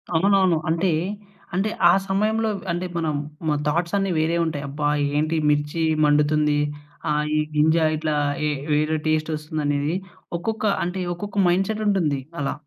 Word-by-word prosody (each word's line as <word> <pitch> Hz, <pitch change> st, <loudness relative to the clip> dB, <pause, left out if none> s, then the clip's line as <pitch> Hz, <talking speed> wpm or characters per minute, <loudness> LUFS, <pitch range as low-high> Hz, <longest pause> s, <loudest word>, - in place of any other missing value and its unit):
అవునవును, 190 Hz, 0 st, +4 dB
అంటే, 170 Hz, +3 st, +1 dB, 0.7 s
అంటే 195 Hz, +4 st, +1 dB, 0.2 s
ఆ -, -, +8 dB, 0.2 s
సమయంలో 215 Hz, +3 st, +1 dB, 0.2 s
అంటే 175 Hz, +2 st, -2 dB
మనం 160 Hz, -3 st, -1 dB, 0.3 s
మన 150 Hz, -1 st, +2 dB
థాట్స్ 170 Hz, +5 st, 0 dB
అన్ని 195 Hz, -1 st, 0 dB
వేరే 160 Hz, +2 st, +1 dB
ఉంటాయి. 150 Hz, -3 st, -3 dB
అబ్బా! 145 Hz, +1 st, -2 dB, 0.3 s
ఏంటి 155 Hz, +2 st, +1 dB
మిర్చి 150 Hz, +2 st, 0 dB, 0.2 s
మండుతుంది. 150 Hz, 0 st, +3 dB, 0.5 s
ఆహ్, 150 Hz, 0 st, +1 dB
ఈ -, -, +3 dB, 0.2 s
గింజా 160 Hz, +2 st, +4 dB
ఇట్లా 155 Hz, -1 st, -1 dB, 0.3 s
ఏ -, -, +1 dB, 0.2 s
వేరే 155 Hz, +1 st, +1 dB
టేస్ట్ 155 Hz, 0 st, +1 dB
వస్తుంది 155 Hz, 0 st, -4 dB
అనేది 145 Hz, +3 st, 0 dB, 0.4 s
ఒక్కొక్క 220 Hz, +5 st, -3 dB, 0.2 s
అంటే, 180 Hz, +2 st, -3 dB, 0.2 s
ఒక్కొక్క 205 Hz, +3 st, -7 dB
మైండ్‌సెట్ 195 Hz, +5 st, +1 dB
ఉంటుంది 165 Hz, -9 st, +1 dB, 0.2 s
అలా. 140 Hz, -, -1 dB
160 Hz, 145 wpm, -23 LUFS, 150-190 Hz, 0.7 s, ఆ